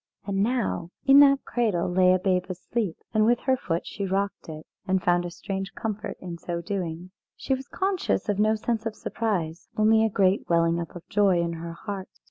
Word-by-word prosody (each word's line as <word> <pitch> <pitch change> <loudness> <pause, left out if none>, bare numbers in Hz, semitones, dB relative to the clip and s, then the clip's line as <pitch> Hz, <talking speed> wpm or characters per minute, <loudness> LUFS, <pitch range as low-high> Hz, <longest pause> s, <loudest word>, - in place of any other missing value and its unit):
And 195 -1 -1
now 220 -7 0 0.2
in 275 +1 +8
that 275 -1 +6
cradle 215 -8 0
lay 180 0 +4
a 185 - +5
babe 185 -1 +1
asleep, 185 +1 -3 0.2
and 215 -1 +4
with 240 +2 +4
her 260 0 +2
foot 170 -9 -3
she 200 - -5
rocked 195 -1 -2
it, 155 0 -8 0.2
and 190 0 +2
found 175 0 +2
a - - -3
strange 195 +2 -5
comfort 215 -1 -4
in 175 -2 -7
so 170 0 -4
doing. 175 -1 -4 0.2
She 270 - -2
was 265 0 -4
conscious 380 -8 -1
of 205 -1 0
no 215 +1 +3
sense 225 +1 -2
of 220 - -5
surprise, 180 -7 -3
only 220 +1 +5
a 225 - +2
great 195 -1 +1
welling 170 0 +3
up 170 0 -6
of 175 - -10
joy 195 -3 +3
in 170 0 -2
her 165 0 -6
heart. 195 +1 -6
195 Hz, 205 wpm, -26 LUFS, 175-220 Hz, 0.2 s, in